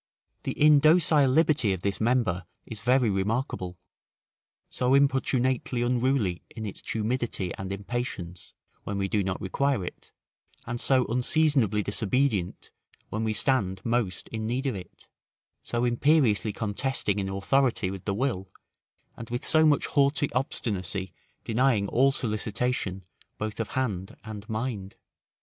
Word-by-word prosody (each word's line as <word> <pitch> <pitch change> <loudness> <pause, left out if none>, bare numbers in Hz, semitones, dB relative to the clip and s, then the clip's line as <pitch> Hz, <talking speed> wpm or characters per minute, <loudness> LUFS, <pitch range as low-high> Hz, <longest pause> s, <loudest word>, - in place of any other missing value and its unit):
The - - -3
indocile 150 -1 +5
liberty 145 -8 +3
of 95 - -5
this 100 +1 -1
member 110 -7 +1 0.2
is 110 - -7
very 125 +3 +3
remarkable, 95 - -2 0.9
so 125 +2 +1
importunately 130 -3 +1
unruly 120 -7 +1
in 110 -2 -7
its 100 - -6
tumidity 110 -5 -2
and 95 0 -6
impatience, 100 -4 -5 0.3
when 100 - -3
we 100 -1 0
do 100 +1 0
not 95 0 -2
require 130 +2 0
it, - - -9 0.5
and 120 0 -4
so 130 -2 +3
unseasonably 125 -3 +2
disobedient, 105 -2 -1 0.4
when 110 +1 -2
we 110 -1 0
stand 105 -5 +1
most 115 -6 -1
in 110 -1 -4
need 125 +4 -1
of 135 - 0
it: 95 -2 -10 0.5
so 120 +1 -1
imperiously 120 -4 +3
contesting 105 0 -1
in 95 -1 -2
authority 105 +1 +1
with 95 -2 -8
the 100 - -1
will, 100 -6 -1 0.7
and 115 - -9
with 120 +1 -3
so 160 -1 +5
much 145 -2 +3
haughty 140 0 +2
obstinacy 100 -7 -2 0.3
denying 115 -3 +2
all 135 +5 +3
solicitation, 110 -4 -2 0.3
both 110 0 -4
of 115 - -1
hand 100 -8 -2
and 110 -1 -8
mind. 110 -4 -3
115 Hz, 135 wpm, -27 LUFS, 100-130 Hz, 0.9 s, indocile